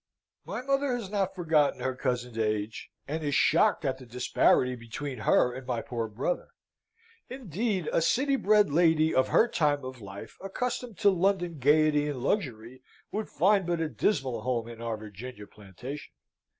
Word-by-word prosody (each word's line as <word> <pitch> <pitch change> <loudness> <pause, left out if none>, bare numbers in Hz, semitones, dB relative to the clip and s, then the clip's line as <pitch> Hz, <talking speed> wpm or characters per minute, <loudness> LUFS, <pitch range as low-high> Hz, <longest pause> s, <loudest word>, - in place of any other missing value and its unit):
"My 250 - -4
mother 275 0 +1
has 215 -5 -6
not 195 -2 -1
forgotten 160 -5 +2
her 130 - -1
cousin's 125 -2 -2
age, 105 0 -2 0.2
and 155 +2 -3
is 145 -2 0
shocked - - +3
at 130 -1 -1
the 130 - -12
disparity 125 +1 +2
between 125 +3 -6
her 125 +3 +3
and 130 0 -8
my 115 -3 -2
poor 115 -2 -3
brother. 120 +11 -2 0.8
Indeed, 210 - -2
a - - +3
city 270 - +2
bred 210 - +3
lady 160 0 +3
of 130 - +3
her 230 - +4
time 145 - +1
of 130 -2 -8
life, 100 +2 -10
accustomed 235 +2 -4
to 200 - +6
London 175 -3 0
gaiety 150 +2 +4
and 145 - -3
luxury, 125 - -2 0.3
would 215 +1 -3
find 195 0 +3
but 170 -1 0
a 160 -1 -1
dismal 135 - 0
home 120 -2 -1
in 115 -1 -10
our 115 -2 -3
Virginian 105 +1 -9
plantation. 105 +9 -9
145 Hz, 165 wpm, -28 LUFS, 125-190 Hz, 0.8 s, to